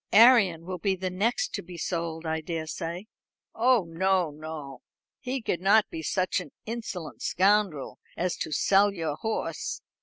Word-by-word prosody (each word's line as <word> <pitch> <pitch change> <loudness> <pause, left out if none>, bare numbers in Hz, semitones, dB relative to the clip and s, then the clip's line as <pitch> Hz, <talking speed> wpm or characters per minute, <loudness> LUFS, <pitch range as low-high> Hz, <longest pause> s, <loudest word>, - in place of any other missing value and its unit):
"Arion 205 -8 +6
will 180 0 -5
be 195 +2 +1
the 185 0 -3
next 210 +7 0
to - - -2
be 175 0 -10
sold, 165 -1 -3
I 160 0 -1
daresay." 165 +2 -4 0.5
"Oh, 240 -2 +4
no, 180 0 +1
no. 150 -3 -8 0.4
He 255 -2 -3
could 175 - -1
not 205 +3 +4
be 160 - -5
such 185 +4 0
an 180 - -9
insolent 220 -8 -6
scoundrel 195 -6 +1 0.2
as 180 0 0
to - - -4
sell 200 +6 +4
your 165 -6 -3
horse. 220 +6 -3
180 Hz, 155 wpm, -27 LUFS, 160-205 Hz, 0.5 s, Arion